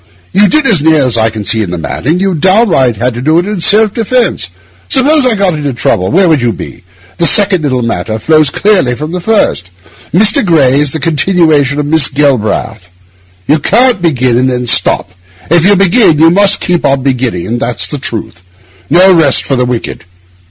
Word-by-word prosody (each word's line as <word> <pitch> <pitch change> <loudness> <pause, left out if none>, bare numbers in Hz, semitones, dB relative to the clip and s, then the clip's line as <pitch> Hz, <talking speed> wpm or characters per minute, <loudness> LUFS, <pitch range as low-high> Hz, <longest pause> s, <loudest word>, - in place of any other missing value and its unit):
You 205 +2 +3
did, 305 +6 +1
as 200 - +2
near 155 -2 +2
as 125 -2 -1
I 110 -1 +1
can 110 -2 -7
see 110 +1 +1
the 90 -3 -5
matter, 85 - -4
what 175 - 0
you 195 -1 0
downright 175 - +1
had 125 +4 -2
to 120 - -7
do 155 +5 +1
in 190 +2 -2
self 210 +4 +3
defence. 230 - -1 0.4
Suppose 275 +1 +2
I 235 - +2
got 195 -3 0
into 145 -3 -4
trouble, 95 -5 -1
where 185 +3 +2
would 155 -5 +1
you 120 -1 0
be? 100 - -10 0.4
This 170 - +3
second 200 -4 +3
little 130 -5 -2
matter 110 -1 -3
flows 155 +5 +1
clearly 180 -8 0
from 150 +5 -6
the 180 0 -5
first. 190 - -1 0.4
Mr. 210 +5 +3
Gray 145 -7 +2
is 145 -2 0
the 160 - -4
continuation 155 -2 0
of 145 - -2
Miss 155 -1 +2
Galbraith. 120 -8 -2 0.6
You 150 +6 +1
can't 235 - +1
begin 130 -7 0
and 130 +1 0
then 125 -1 -3
stop. 115 - 0 0.4
If 170 -1 +3
you 200 +2 +3
begin, 195 -2 +2
you 165 +2 +4
must 200 +2 +2
keep 175 -1 -1
on 135 -1 0
beginning; 120 -5 -2
that's 120 -3 -1
the 145 - -6
truth. 110 -8 -6 0.5
No 185 +4 +4
rest 160 -6 +2
for 135 - -2
the 125 -1 0
wicked. 125 -7 -5
150 Hz, 195 wpm, -9 LUFS, 125-190 Hz, 0.6 s, you